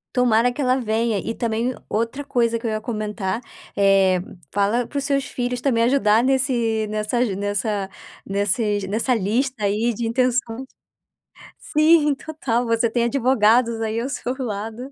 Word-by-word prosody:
Tomara 245 -1 +3
que 290 - -4
ela 255 -1 +2
venha. 220 -2 0
E 230 - -4
também 235 +2 -1
o - - -17
outra 230 +6 -2
coisa 235 -4 +1
que 230 - -9
eu 220 - 0
ia 215 - -1
comentar, 215 -1 -3 0.3
eh, 195 -2 +4 0.3
fala 205 +4 +1
para 285 - -6
os 275 - -1
seus 275 -1 0
filhos 245 0 -3
também 235 -4 +1
ajudar 235 -3 +3
nesse 240 -5 +1
nessa 215 +3 -2
aju 235 -6 +1
nessa 205 0 -2 0.4
nesses 205 +1 0
nessa 225 +5 0
lista 225 +2 -1
aí 220 +4 +1
de 230 +2 -3
intenções. 250 +1 0 0.9
Sim, 305 -1 +3
total, 260 -6 -2
você 230 0 +1
tem 235 +1 0
advogados 235 -2 +3
aí 225 +1 -1
ao 260 - -3
seu 255 -2 -3
lado 225 +2 -5
230 Hz, 160 wpm, -22 LUFS, 215-255 Hz, 0.9 s, eh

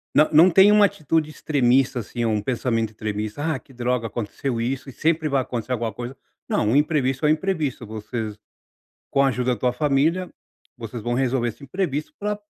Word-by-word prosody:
não 155 - +5
não 160 +4 +7
tem 190 +3 +6
uma 210 0 +6
atitude 155 -3 0
extremista, 135 -4 +2
assim, 120 +2 -5
é - - +1
um 105 -2 +1
pensamento 115 -1 -1
extremista: 105 +4 -4
"Ah, - - -5
que 135 - -20
droga 125 -1 -1
aconteceu 115 +3 -3
isso 130 +4 -3
e - - -8
sempre 155 +3 0
vai 135 -1 +2
acontecer 125 -1 -5
alguma 115 -3 -2
coisa", 120 +4 -7 0.3
não, 105 - +1
o - - +2
imprevisto 145 -2 +1
é - - +4
imprevisto, 155 -4 -1
vocês, 110 0 -5 0.7
com 140 - +3
a 135 - +4
ajuda 125 -1 0
da 110 - -13
tua 125 -1 +2
família, 150 +7 +1 0.5
vocês 115 -1 -7
vão 120 +2 -1
resolver 130 -1 +1
esse 120 - -9
imprevisto 150 - -3
para 210 0 -2
130 Hz, 190 wpm, -23 LUFS, 115-150 Hz, 0.7 s, não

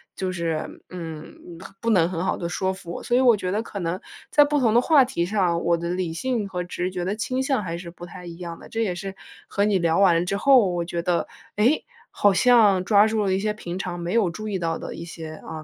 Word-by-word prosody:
就 185 -1 -2
是， 165 -3 -3
嗯， 165 -3 -8 0.2
很 195 - -11
不 230 - 0
能 170 -4 +4
很 180 0 -3
好 - - +1
地 170 -1 -4
说 190 +1 -1
服 175 -2 -9
我。 - - -7
所 240 - 0
以 - - +4
我 240 -5 +5
觉 185 -1 -3
得 210 +3 0
可 200 -3 -7
能 175 +1 -2 0.3
在 295 - +7
不 295 0 +1
同 230 -5 +3
的 240 - +5
话 280 -3 +5
题 170 -10 -1
上， 180 -3 0
我 170 0 +2
的 170 +1 -4
理 180 -2 -2
性 230 +3 -2
和 180 -1 -3
直 180 +1 -3
觉 180 -1 -3
的 200 +3 -1
倾 255 +4 -2
向 265 -6 0
还 170 -1 -4
是 170 -1 -8
不 175 0 -10
太 180 0 -11
一 170 -1 -8
样 170 -2 -7
的。 - - -12
这 225 0 -1
也 185 -5 -1
是 195 +2 -6 0.3
和 200 - 0
你 205 -2 +2
聊 170 0 +2
完 175 -3 +4
之 190 - -1
后， 250 -3 +5
我 175 -1 -1
觉 170 0 -3
得， 175 -2 0 0.3
诶， 240 +9 +2 0.3
好 205 -1 +3
像 205 -2 +5
抓 205 0 +6
住 220 -1 0
了 190 - +1
一 190 - +1
些 210 +1 -1
平 180 -4 -6
常 175 -2 -4
没 175 +3 -3
有 215 -6 +3
注 215 +5 -6
意 200 - -1
到 165 -1 -1
的 - - -7
一 170 - -7
些， 160 -2 -8
啊， 155 0 -8
185 Hz, 285 characters per minute, -24 LUFS, 170-215 Hz, 0.3 s, 在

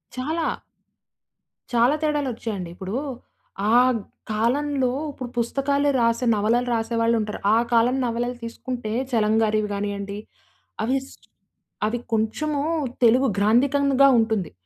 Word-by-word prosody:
చాలా. 315 +6 -1 1.2
చాలా 240 +4 +3
తేడాలొచ్చాయండి. 240 - -2
ఇప్పుడూ 190 +4 -5 0.8
ఆహ్, 250 +1 +5 0.3
కాలంలో 260 +5 +1 0.2
ఇప్పుడు 255 -3 -7
పుస్తకా‌లే 280 +4 +1
రాసే, 230 +2 +1
నవలలు 230 +4 +1
రాసే 230 0 -1
వాళ్ళుంటారు. 225 -2 0 0.2
ఆ - - +4 0.2
కాలం 235 +2 +4
నవలలు 240 +1 -2
తీసుకుంటే 235 -1 -5 0.2
చలం 215 -3 +2
గారివి 215 -1 +1
గానియ్యండి, 200 0 -4 0.6
అవిస్ట్ 265 +3 -3 0.6
అవి 230 +3 -1
కొంచమూ 280 +7 0 0.4
తెలుగు 250 +4 +5
గ్రాంథికంగా 275 +6 +4
ఉంటుంది. 220 -7 0
235 Hz, 100 wpm, -23 LUFS, 220-265 Hz, 1.2 s, ఆహ్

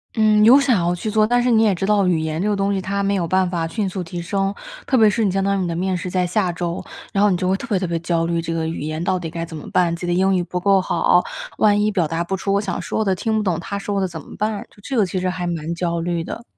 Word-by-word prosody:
嗯， 215 -1 +4
有 255 +6 +8
想 260 -6 +3
要 175 0 +1
去 195 +5 -4
做， 215 0 +3
但 245 +2 +2
是 250 - +1
你 225 -1 +4
也 210 -3 +3
知 190 +1 -2
道 205 -1 +3
语 175 -3 +2
言 160 +1 -2
这 210 - 0
个 - - +2
东 200 0 0
西 195 - -1
它 200 +2 -2
没 200 0 +1
有 175 - 0
办 185 +1 +1
法 170 -2 -1
迅 195 +5 -2
速 185 -1 -4
提 175 +1 -6
升， 195 +2 -1 0.3
特 260 - +2
别 220 -3 +6
是 225 +2 0
你 195 - +2
相 195 - 0
当 200 0 +1
于 190 - -1
你 180 - -1
的 - - -2
面 185 +2 -1
试 180 +1 -4
在 180 -1 +1
下 185 0 0
周， 170 0 -4 0.3
然 200 - +2
后 210 - +5
你 180 - +1
就 185 - -1
会 190 - +2
特 - - -6
别 205 -5 0
特 185 - -2
别 170 - -1
焦 165 0 0
虑 170 0 0
这 165 0 -3
个 160 -1 -1
语 160 - -4
言 155 +1 -3
到 185 +2 0
底 170 -2 -5
该 165 +1 -4
怎 165 -1 -9
么 150 - -8
办， 170 -2 +2
自 170 - -12
己 175 - -3
的 175 - +1
英 190 +2 +2
语 180 - +1
不 180 +1 -4
够 195 0 +3
好， - - +2 0.4
万 205 -1 +4
一 210 - +2
表 185 -6 +1
达 165 +1 -2
不 195 - -2
出 195 +1 -2
我 - - +3
想 200 -2 -3
说 220 - -2
的， 190 -1 +2
听 220 +4 -1
不 - - +1
懂 185 -5 0
他 200 +2 -4
说 200 0 -2
的 190 - +1
怎 170 -2 -7
么 - - -12
办， 215 -1 -2 0.2
这 270 - -3
个 210 - +4
其 185 - -4
实 185 0 0
还 180 -1 -3
蛮 165 -1 -3
焦 170 -1 -1
虑 170 -1 -2
的。 235 - -7
185 Hz, 355 characters per minute, -21 LUFS, 170-205 Hz, 0.4 s, 有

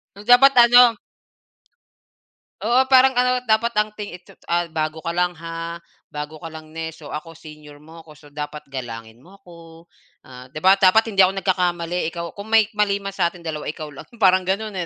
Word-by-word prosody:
So, 200 - -12
dapat 250 +3 +6
ano. 240 -1 +7 1.7
Oo, 255 +3 +2
parang 265 0 +5
ano, 250 0 0
dapat 230 +1 +1
ang 210 0 +1
ting 205 -4 -8
itsu 180 - -20 0.2
ah, 175 0 +1
"Bago 155 0 -3
ka 170 - -2
lang 180 0 -1
ha, 165 +1 -7 0.3
bago 150 +1 -8
ka 165 - -7
lang 155 -1 -12
ne, 160 0 -5
so 160 -2 -11
ako 165 +1 -8
senior 150 -2 -14
mo 160 +3 -15
ko 155 -2 -16
so 145 -1 -19
dapat 150 0 -7
galangin 115 -3 -8
mo 185 +8 -18
ako, 170 -3 -16 0.4
ah, 125 0 -13
di 135 - -23
ba 190 - +7
dapat 195 +4 +5
hindi 195 - +1
ako 190 +1 +4
nagkakamali 180 -3 -1
ikaw 170 0 -6
kung 205 +2 -10
may 220 -1 +5
mali 210 -2 +1
man 195 0 -6
sa 180 -3 0
atin 170 0 -15
2 155 -2 -5
ikaw 155 -1 -7
lang," 145 - -12
parang 190 -3 +4
gano'n, 215 +3 -2
175 Hz, 195 wpm, -21 LUFS, 155-210 Hz, 1.7 s, ano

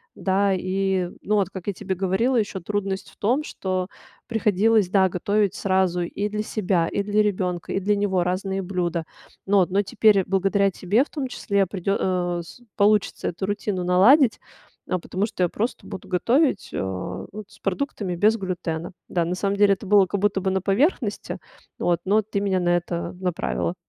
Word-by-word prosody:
да. 195 +1 +1
И, 185 0 -1
ну, 210 - 0
вот, 195 -3 +2
как 190 -1 -8
я 205 - 0
тебе 190 +1 -3
говорила, 195 +8 +1
еще 200 -4 -1
трудность 195 0 -3
в - - -24
том, 250 +8 +1
что 185 -8 -3 0.4
приходилось, 220 -2 +2
да, 190 -1 +4
готовить 200 +2 0
сразу 190 -4 +1
и 200 +4 -2
для 210 0 -2
себя, 185 -6 0
и 200 - -1
для 210 +1 +2
ребенка, 185 -4 -1
и - - +1
для 205 +2 +1
него 195 -3 +1
разные 190 +2 -2
блюда. 175 -3 -2 0.4
Но 195 -1 +4
но 195 +2 +1
теперь, 200 0 +3
благодаря 195 +1 +2
тебе 200 +7 +2
в - - -14
том 285 -4 -3
числе, 200 -5 0
придё 195 +1 -1
э, 175 -2 0
с 170 - -14 0.2
получится 210 0 +2
эту 180 +3 -4
рутину 200 -2 -2
наладить. 220 - +5 0.5
Э, - - +1
потому 190 +4 -2
что 185 - -2
я 175 - +2
просто 225 +8 -3
буду 200 - -8
готовить, 245 - +1
э, - - -3
вот 95 - -5
с - - -19
продуктами 195 -3 -2
без 210 +5 +4
глютена. 175 -4 -4 0.2
Да, 175 -2 0
на 175 +2 -2
самом 200 +2 -1
деле 200 -1 +5
это 195 - -6
было 200 -1 +6
как 200 +2 -2
будто 205 -1 +1
бы 190 - 0
на 190 0 0
поверхности, 215 - 0 0.4
вот, 175 -1 +1
но 210 +3 +3
ты 205 -1 -3
меня 195 -2 +1
на 175 -1 0
это 170 0 -4
направила. 180 -1 -2
195 Hz, 185 wpm, -24 LUFS, 180-205 Hz, 0.5 s, было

